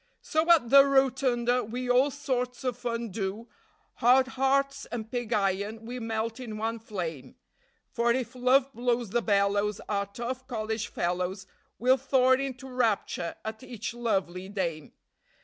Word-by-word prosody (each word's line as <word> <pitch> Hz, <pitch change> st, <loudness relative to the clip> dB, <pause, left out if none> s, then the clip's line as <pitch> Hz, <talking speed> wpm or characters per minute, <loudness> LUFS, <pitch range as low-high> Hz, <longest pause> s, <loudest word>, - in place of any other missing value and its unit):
So 315 Hz, +2 st, 0 dB
at 310 Hz, -9 st, +5 dB
the 275 Hz, 0 st, +10 dB
Rotunda 260 Hz, -3 st, +2 dB
we 245 Hz, +4 st, -4 dB
all 250 Hz, +3 st, +4 dB
sorts 255 Hz, -3 st, -3 dB
of 250 Hz, -2 st, -1 dB
fun 235 Hz, -2 st, -3 dB
do, 200 Hz, +3 st, -4 dB, 0.5 s
Hard 255 Hz, +2 st, +5 dB
hearts 275 Hz, +1 st, +1 dB
and 225 Hz, -2 st, -6 dB
pig 245 Hz, -2 st, -3 dB
iron 205 Hz, +1 st, 0 dB
we 250 Hz, +2 st, -5 dB
melt 225 Hz, +1 st, -3 dB
in 225 Hz, -4 st, -6 dB
one 225 Hz, +1 st, -2 dB
flame; 175 Hz, -, -6 dB, 0.6 s
For 235 Hz, 0 st, +2 dB
if 250 Hz, 0 st, -1 dB
Love 255 Hz, +2 st, +3 dB
blows 240 Hz, -2 st, -1 dB
the 240 Hz, +2 st, +2 dB
bellows, 205 Hz, -1 st, +1 dB
our 200 Hz, -1 st, -1 dB
tough 250 Hz, +5 st, -5 dB
college 220 Hz, -3 st, -3 dB
fellows 180 Hz, +2 st, -2 dB, 0.3 s
Will 255 Hz, +3 st, +4 dB
thaw 260 Hz, -1 st, +3 dB
into 265 Hz, 0 st, 0 dB
rapture 225 Hz, -8 st, -1 dB
at 220 Hz, 0 st, -5 dB
each 235 Hz, -3 st, -6 dB
lovely 195 Hz, -6 st, -2 dB
dame. 170 Hz, -7 st, -3 dB
235 Hz, 150 wpm, -28 LUFS, 210-255 Hz, 0.6 s, the